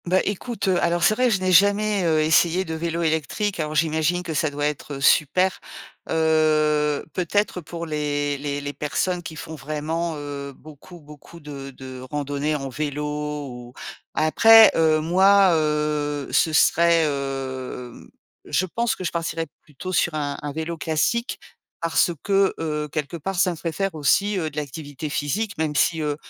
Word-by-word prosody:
Bah, 185 +2 +3
écoute, 205 +1 -3
heu. 185 -2 +2
Alors 170 0 +1
c'est 215 - +5
vrai, 250 +2 +2
je 205 -5 +1
n'ai 185 0 +1
jamais, 205 +2 +4
heu, 160 -2 +3
essayé 170 +3 +3
de 160 - -5
vélo 170 +1 -2
électrique, 160 +5 -1
alors 155 -1 -2
j'imagine 160 +2 +1
que 165 - -4
ça 155 +1 +1
doit 145 0 -3
être, 150 0 -3
heu 135 - -7
super. 180 +7 +3 0.5
Heu, 155 -2 +2
peut-être 185 +1 -1
pour 170 +1 -7
les 145 -2 -2
les 145 0 -3
les 145 0 -5
personnes 175 +5 -2
qui 160 -2 -8
font 160 - -8
vraiment, 155 +3 -3
heu, 140 -1 -6
beaucoup 155 +5 -14
beaucoup 150 +2 -14
de 140 -3 -8
de 130 -1 -9
randonnées 145 +1 -2
en 135 -2 -4
vélo 150 +2 -3 0.5
ou 120 0 -10 0.4
après, 220 +9 +7
heu, 160 -1 +3
moi, 190 +3 +5
heu, 150 -2 -1
ce 160 - +3
serait, 170 +1 +4
hem 135 -4 -5 0.4
je 185 - 0
pense 235 +6 -1
que - - -7
je 170 - -2
partirais 165 -1 -2 0.2
plutôt 160 +6 -8
sur 175 -2 +1
un 145 -2 -2
un 145 - -4
vélo 160 +3 -4
classique 165 - -1 0.4
parce 165 +1 +2
que, 195 -1 +2
heu, 150 -2 -2
quelque 150 +3 -4
part, 190 +5 -4
ça 185 - +4
me 175 - -3
ferait 165 +1 -4
faire 195 +3 -2
aussi, 195 +7 +2
heu, 160 -4 -2
de 145 - -13
l'activité 150 0 -5
physique, 190 +10 -2
même 155 -1 -1
si, 160 +4 +2
heu, 150 -1 -1
155 Hz, 175 wpm, -23 LUFS, 145-175 Hz, 0.5 s, après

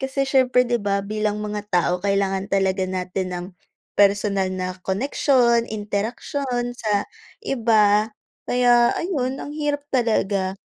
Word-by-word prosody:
Kasi 270 +1 -1
siyempre 255 -2 +3
'di 240 - +1
ba, 200 -2 -1
bilang 210 +1 -2
mga 210 -1 -4
tao 180 -1 +2
kailangan 195 -1 0
talaga 190 -1 +1
natin 185 0 -3
ng 175 0 -5 0.5
personal 200 -1 +3
na 185 0 -3
koneksyon, 235 +2 +2
interaksyon 240 +4 -3
sa 205 -2 0 0.4
iba 220 - +3 0.4
kaya 245 -1 +4
ayun 270 -7 -2
ang - - -7
hirap 290 -1 -2
talaga. 200 -6 0
210 Hz, 125 wpm, -22 LUFS, 195-250 Hz, 0.5 s, kaya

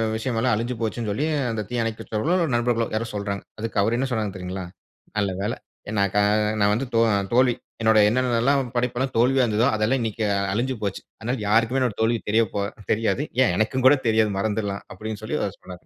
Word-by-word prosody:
விஷயம் 115 +1 -2
எல்லாம் 115 - +2
அழிஞ்சு 120 +3 -2
போச்சுன்னு 115 0 -2
சொல்லி 115 +9 -1 0.3
அந்த 110 -1 -2
தீயணைப்பு 115 -2 -2
வீரர்களோ, 165 +11 +1
நண்பர்களோ 120 -1 +1
யாரோ 110 +2 -1
சொல்றாங்க. 100 -1 -3 0.2
அதுக்கு 115 0 -4
அவரு 115 +4 +1
என்ன 135 +2 0
சொன்னாரு 110 -4 -1
தெரியுங்களா? 95 0 -5 0.5
நல்ல 100 -2 +1
வேள, 105 +4 -1 0.4
நான் 100 -1 +2
க - - +4 0.4
நான் 100 0 +4
வந்து 125 +5 -1
தோ 115 - +5 0.3
தோல்வி, 125 0 +4 0.3
என்னோட 110 -1 +5
என்னென்னெல்லாம் 125 +3 +2 0.2
படைப்பு 120 0 0
எல்லாம் 130 0 -2
தோல்வியா 130 +2 +4
இருந்ததோ 110 +2 +2
அதெல்லாம் 110 +5 +1
இன்னைக்கு 110 -1 -2 0.3
அழிஞ்சு 125 +4 -1
போச்சு. 100 -2 -2 0.2
அதனால 120 +3 -2
யாருக்குமே 115 +5 +3
என்னோட 125 -5 0
தோல்வி 115 +1 +2
தெரியப் 110 -1 +2
போ 100 - 0 0.3
தெரியாது, 115 +6 0 0.2
ஏன் 105 - +2
எனக்கும் 125 +4 0
கூட 145 - +7
தெரியாது, 110 -1 +3
மறந்துடலாம் 100 -1 -2
அப்டின்னு 110 +2 -6
சொல்லி 120 +8 -2
அவரு 100 - -4
சொன்னாரு. 90 -1 -11
115 Hz, 190 wpm, -24 LUFS, 105-125 Hz, 0.5 s, கூட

